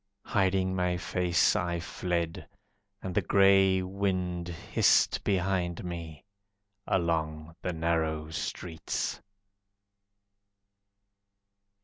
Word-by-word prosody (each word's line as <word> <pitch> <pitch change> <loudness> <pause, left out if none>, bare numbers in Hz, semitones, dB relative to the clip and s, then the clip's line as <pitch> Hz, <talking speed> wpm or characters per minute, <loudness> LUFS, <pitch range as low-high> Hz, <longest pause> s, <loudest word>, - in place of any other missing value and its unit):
Hiding 95 -1 +1
my 90 -1 0
face 90 -1 +2
I 85 -1 -1
fled, 85 -1 -3 0.6
And 95 - -4
the 105 - +2
grey 95 0 +4
wind 90 -2 -2
hissed 85 -2 +2
behind 90 -2 0
me, 85 -2 -7 0.6
Along 80 -2 -1
the 90 - -2
narrow 80 -2 -1
streets. 80 +2 -4
90 Hz, 80 wpm, -29 LUFS, 85-95 Hz, 0.6 s, grey